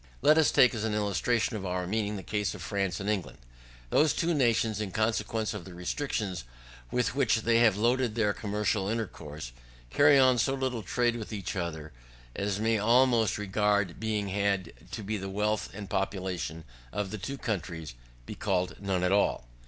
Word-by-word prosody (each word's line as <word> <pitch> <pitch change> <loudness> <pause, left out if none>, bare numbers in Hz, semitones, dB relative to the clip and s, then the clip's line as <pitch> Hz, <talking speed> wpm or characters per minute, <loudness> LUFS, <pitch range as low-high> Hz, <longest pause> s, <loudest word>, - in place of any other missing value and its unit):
Let 150 +2 +6
us 160 - +5
take, 125 - +5
as 110 -2 -3
an 110 -1 0
illustration 105 +3 0
of 100 - -6
our 90 -1 -2
meaning, 105 +2 -1
the 95 - -6
case 105 0 -2
of 95 - -8
France 100 -2 -1
and 100 - -4
England. 105 -4 -2 0.5
Those 150 -1 +4
two 170 0 +1
nations, 115 -6 +2
in 105 - -2
consequence 110 0 0
of 105 -4 -6
the 90 0 -11
restrictions 95 - -3 0.5
with 125 -1 0
which 125 -5 +2
they 115 +1 +3
have 115 -4 +4
loaded 120 +1 +1
their 105 -3 +2
commercial 105 -1 -1
intercourse, 75 - -5 0.4
carry 145 - +6
on 130 -2 +5
so 135 +4 +2
little 130 -3 -2
trade 120 +5 0
with 110 -1 -7
each 100 -2 -4
other, 80 -4 -4 0.4
as 100 0 -1
may 110 0 +2
almost, 115 -1 +4
regard 105 -2 0
being 105 -2 -1
had 100 -3 0 0.2
to 110 - -6
the 100 -1 -3
wealth 105 +2 -1
and 100 0 -7
population 95 -4 -3 0.3
of 105 -1 -3
the 110 - -5
two 135 +8 -5
countries, 85 - -4 0.3
be - - -6
called 90 0 -1
none 95 -2 0
at 90 - +2
all. 100 -11 +2
105 Hz, 180 wpm, -29 LUFS, 95-115 Hz, 0.5 s, Let